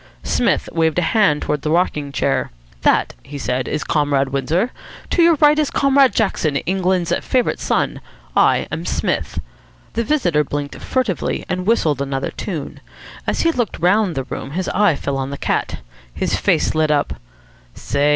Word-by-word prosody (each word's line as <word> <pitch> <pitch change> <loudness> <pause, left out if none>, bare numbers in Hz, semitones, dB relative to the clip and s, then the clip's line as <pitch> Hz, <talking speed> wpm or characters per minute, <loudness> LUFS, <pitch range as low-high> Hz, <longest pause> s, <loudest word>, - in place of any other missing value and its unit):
Psmith - - +1
waved 160 -1 +1
a 180 - +2
hand 180 -10 +3
towards 150 -1 -1
the 150 - -2
rocking 150 -4 0
chair. 140 0 0 0.3
"That," - - +2
he 145 - -9
said, 130 -1 -2
"is 150 - -2
Comrade 145 -3 +1
Windsor. 160 - 0 0.4
To 350 - +3
your 335 -1 +6
right 300 +1 +4
is 300 - +1
Comrade 275 -4 +3
Jackson, 170 -9 +1
England's 180 +2 0
favourite 250 -2 0
son. - - -1 0.3
I - - +3
am - - -3
Psmith." - - -1 0.6
The 230 - 0
visitor 180 - +2
blinked 145 0 -4
furtively, 245 -9 -1
and 180 +1 -3
whistled 155 - +2
another 135 -1 -2
tune. 165 -8 -5 0.5
As - - 0
he 330 - +3
looked 240 - -2
round 185 0 +2
the 135 - -1
room, 130 - -6
his 185 - -1
eye 200 -5 +3
fell 140 0 -3
on 135 0 -2
the 140 - -5
cat. - - -2 0.3
His - - -1
face - - +1
lit 155 -1 +2
up. 145 -1 +1 0.6
"Say!" 145 +1 0
165 Hz, 170 wpm, -19 LUFS, 145-215 Hz, 0.6 s, your